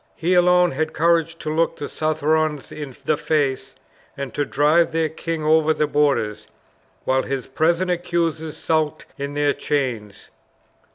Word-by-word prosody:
He 175 Hz, +2 st, 0 dB
alone 180 Hz, 0 st, +4 dB
had 155 Hz, +4 st, -2 dB
courage 165 Hz, 0 st, +2 dB
to 155 Hz, -, -4 dB
look 165 Hz, +1 st, +1 dB
the 145 Hz, -, -5 dB
Southrons 155 Hz, -1 st, -1 dB
in 145 Hz, -4 st, -7 dB
the 155 Hz, -, +2 dB
face, 145 Hz, -4 st, -1 dB, 0.4 s
and 140 Hz, -4 st, -5 dB
to 145 Hz, -, -1 dB
drive 150 Hz, +5 st, +3 dB
their 160 Hz, -1 st, +1 dB
king 160 Hz, 0 st, -4 dB
over 155 Hz, 0 st, +3 dB
the 150 Hz, -, +1 dB
borders, 140 Hz, -9 st, 0 dB, 0.6 s
while 130 Hz, 0 st, +2 dB
his 135 Hz, -2 st, -4 dB
present 170 Hz, +6 st, +1 dB
accusers 170 Hz, -3 st, -2 dB
skulked 155 Hz, -1 st, -1 dB
in 140 Hz, +1 st, -4 dB
their 145 Hz, -1 st, +2 dB
chains!" 120 Hz, -8 st, -3 dB
155 Hz, 150 wpm, -22 LUFS, 145-165 Hz, 0.6 s, alone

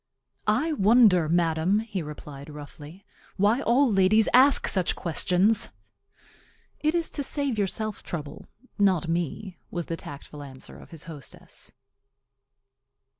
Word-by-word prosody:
"I 290 Hz, +10 st, +1 dB
wonder, 205 Hz, -, +4 dB
madam," 170 Hz, +2 st, +2 dB
he 210 Hz, -5 st, -5 dB
replied, 150 Hz, -1 st, -9 dB
roughly, 150 Hz, +4 st, -11 dB, 0.3 s
"why 210 Hz, +6 st, +2 dB
all 265 Hz, +4 st, +3 dB
ladies 210 Hz, +1 st, +3 dB
ask 265 Hz, +2 st, +5 dB
such 185 Hz, -3 st, +2 dB
questions?" 185 Hz, +6 st, +1 dB, 1.1 s
"It 310 Hz, +2 st, 0 dB
is 335 Hz, -1 st, 0 dB
to 290 Hz, -, -2 dB
save 275 Hz, -4 st, -1 dB
yourself 210 Hz, +1 st, -2 dB
trouble, 150 Hz, -4 st, -7 dB, 0.3 s
not 185 Hz, -5 st, +2 dB
me," 175 Hz, +3 st, -3 dB
was 175 Hz, -2 st, -4 dB
the 165 Hz, -, -4 dB
tactful 145 Hz, 0 st, -10 dB
answer 135 Hz, -2 st, -11 dB
of -, -, -15 dB
his 165 Hz, -3 st, -10 dB
hostess. 155 Hz, -4 st, -10 dB
185 Hz, 125 wpm, -26 LUFS, 160-220 Hz, 1.1 s, ask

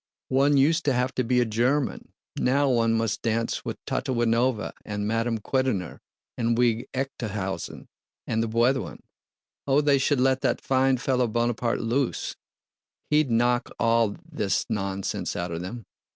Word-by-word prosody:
"One 140 Hz, +2 st, +3 dB
used 160 Hz, +4 st, +3 dB
to 140 Hz, -, +3 dB
have 125 Hz, +1 st, 0 dB
to 130 Hz, -, 0 dB
be 125 Hz, +1 st, +2 dB
a -, -, +2 dB
German—now 130 Hz, +3 st, 0 dB
one 115 Hz, -2 st, +2 dB
must 115 Hz, -2 st, -1 dB
dance 115 Hz, 0 st, -1 dB
with -, -, -4 dB
Tatáwinova 120 Hz, -1 st, 0 dB
and 105 Hz, -1 st, -3 dB
Madame 115 Hz, +1 st, 0 dB
Kwüdener, 110 Hz, -, -1 dB, 0.4 s
and 115 Hz, -1 st, 0 dB
wead 120 Hz, -1 st, +2 dB
Ecka'tshausen 110 Hz, -8 st, -4 dB, 0.4 s
and 115 Hz, 0 st, 0 dB
the 115 Hz, -, 0 dB
bwethwen. 120 Hz, +4 st, 0 dB, 0.6 s
Oh, 135 Hz, +1 st, +4 dB
they 145 Hz, -2 st, +3 dB
should 140 Hz, 0 st, +2 dB
let 130 Hz, 0 st, +2 dB
that 125 Hz, -3 st, +1 dB
fine 130 Hz, 0 st, +2 dB
fellow 125 Hz, 0 st, +1 dB
Bonaparte 120 Hz, +1 st, 0 dB
loose—he'd 140 Hz, +3 st, -3 dB
knock 120 Hz, +1 st, +2 dB
all 115 Hz, -2 st, +2 dB
this 105 Hz, -, -1 dB
nonsense 100 Hz, -2 st, -2 dB
out 85 Hz, 0 st, -3 dB
of 85 Hz, 0 st, -4 dB
them! 100 Hz, +4 st, -7 dB
120 Hz, 140 wpm, -26 LUFS, 115-130 Hz, 0.6 s, Oh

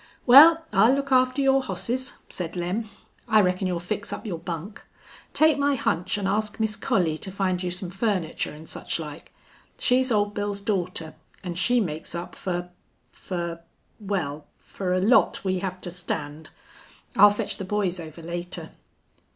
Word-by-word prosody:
"Wal, 320 Hz, +6 st, +9 dB
I'll 220 Hz, +7 st, +5 dB
look 275 Hz, 0 st, -3 dB
after 255 Hz, +1 st, +3 dB
your 270 Hz, 0 st, +4 dB
hosses," 245 Hz, +4 st, -2 dB
said 175 Hz, -1 st, -4 dB
Lem. 185 Hz, +6 st, -2 dB, 0.4 s
"I 220 Hz, -2 st, +5 dB
reckon 185 Hz, -1 st, +2 dB
you'll 180 Hz, -2 st, -1 dB
fix 205 Hz, +4 st, -4 dB
up -, -, -6 dB
your 175 Hz, -6 st, -4 dB
bunk. 175 Hz, +5 st, -6 dB, 0.5 s
Take 310 Hz, -2 st, +4 dB
my 285 Hz, 0 st, +2 dB
hunch 180 Hz, -6 st, 0 dB
an' 200 Hz, -, -3 dB
ask 210 Hz, +2 st, -1 dB
Miss 220 Hz, -1 st, +1 dB
Collie 160 Hz, -7 st, 0 dB
to 190 Hz, -, -6 dB
find 185 Hz, -2 st, -1 dB
you 180 Hz, -, -2 dB
some 180 Hz, 0 st, -5 dB
furniture 190 Hz, -4 st, -1 dB
an' 155 Hz, +2 st, -11 dB
sich -, -, -4 dB
like. 150 Hz, 0 st, -8 dB, 0.5 s
She's 255 Hz, +1 st, +2 dB
Ole 205 Hz, -2 st, +3 dB
Bill's 205 Hz, -1 st, -3 dB
daughter, 180 Hz, -5 st, -2 dB, 0.3 s
an' 180 Hz, -2 st, -4 dB
she 240 Hz, +8 st, +2 dB
makes 160 Hz, -5 st, -4 dB
up 170 Hz, +1 st, -5 dB
fer 175 Hz, -1 st, -4 dB, 0.4 s
fer 170 Hz, -2 st, -5 dB, 0.4 s
wal, 175 Hz, -8 st, -3 dB
fer 185 Hz, -2 st, -5 dB
a -, -, +2 dB
lot 205 Hz, +2 st, +3 dB
we 185 Hz, -1 st, 0 dB
hev 185 Hz, -1 st, -4 dB
to 175 Hz, -, -6 dB
stand. 160 Hz, -3 st, -5 dB, 0.7 s
I'll 205 Hz, +1 st, +9 dB
fetch 205 Hz, -, -3 dB
the -, -, -5 dB
boys 190 Hz, -2 st, -1 dB
over 160 Hz, 0 st, -9 dB
later." 175 Hz, +2 st, -5 dB
190 Hz, 165 wpm, -25 LUFS, 175-220 Hz, 0.7 s, Wal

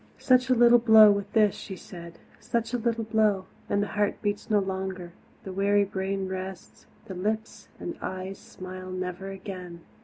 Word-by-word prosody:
"Such 255 Hz, -1 st, +3 dB
a 255 Hz, -, +5 dB
little 240 Hz, 0 st, +7 dB
blow 220 Hz, -2 st, +8 dB
with 200 Hz, 0 st, -2 dB
this," 210 Hz, -3 st, +4 dB
she 195 Hz, -, -8 dB
said, 170 Hz, -2 st, -11 dB, 0.2 s
"such 230 Hz, 0 st, -2 dB
a 245 Hz, -, +1 dB
little 230 Hz, 0 st, -1 dB
blow 215 Hz, -3 st, +1 dB, 0.2 s
and 205 Hz, -, +1 dB
the 205 Hz, -, -4 dB
heart 205 Hz, 0 st, 0 dB
beats 205 Hz, +2 st, -2 dB
no 215 Hz, -, +4 dB
longer, 190 Hz, -2 st, -3 dB, 0.3 s
the 190 Hz, -, -7 dB
weary 200 Hz, +1 st, +3 dB
brain 195 Hz, 0 st, -3 dB
rests, 190 Hz, -1 st, -7 dB, 0.2 s
the 190 Hz, -, -7 dB
lips 215 Hz, +4 st, -3 dB
and 345 Hz, -, -5 dB
eyes 185 Hz, +1 st, -5 dB
smile 185 Hz, 0 st, -9 dB
never 185 Hz, +1 st, -5 dB
again! 185 Hz, -3 st, -8 dB
195 Hz, 175 wpm, -27 LUFS, 185-220 Hz, 0.3 s, blow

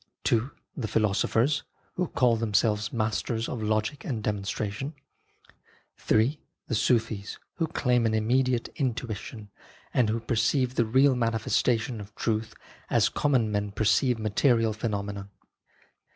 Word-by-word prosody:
II. 115 Hz, +3 st, +2 dB, 0.3 s
The 120 Hz, -6 st, -3 dB
philosophers, 110 Hz, +7 st, +1 dB, 0.3 s
who 180 Hz, -1 st, -1 dB
call 125 Hz, -5 st, +2 dB
themselves 110 Hz, 0 st, +1 dB
masters 115 Hz, +1 st, -1 dB
of 120 Hz, -, -4 dB
Logic 110 Hz, +6 st, -1 dB
and 115 Hz, -6 st, -3 dB
Demonstration. 105 Hz, +6 st, -3 dB, 1.2 s
III. 120 Hz, +8 st, +3 dB, 0.3 s
The -, -, -3 dB
Sufis, 110 Hz, -3 st, 0 dB, 0.2 s
who 165 Hz, -2 st, 0 dB
claim 125 Hz, -6 st, +1 dB
an 110 Hz, -, +1 dB
immediate 125 Hz, +2 st, +1 dB
in 130 Hz, -7 st, 0 dB
tuition, 110 Hz, -2 st, -7 dB, 0.4 s
and 120 Hz, -4 st, +3 dB
who 115 Hz, +2 st, 0 dB
perceive 120 Hz, +3 st, +1 dB
the 120 Hz, -3 st, +1 dB
real 130 Hz, +4 st, +5 dB
manifestation 115 Hz, 0 st, 0 dB
of 100 Hz, 0 st, -12 dB
truth 110 Hz, 0 st, -2 dB, 0.3 s
as 115 Hz, -2 st, +3 dB
common 130 Hz, -7 st, +1 dB
men 105 Hz, -1 st, -2 dB
perceive 110 Hz, +4 st, +2 dB
material 110 Hz, +1 st, +2 dB
pheno 105 Hz, -2 st, -2 dB
mena. 100 Hz, -1 st, -6 dB
115 Hz, 130 wpm, -27 LUFS, 110-125 Hz, 1.2 s, real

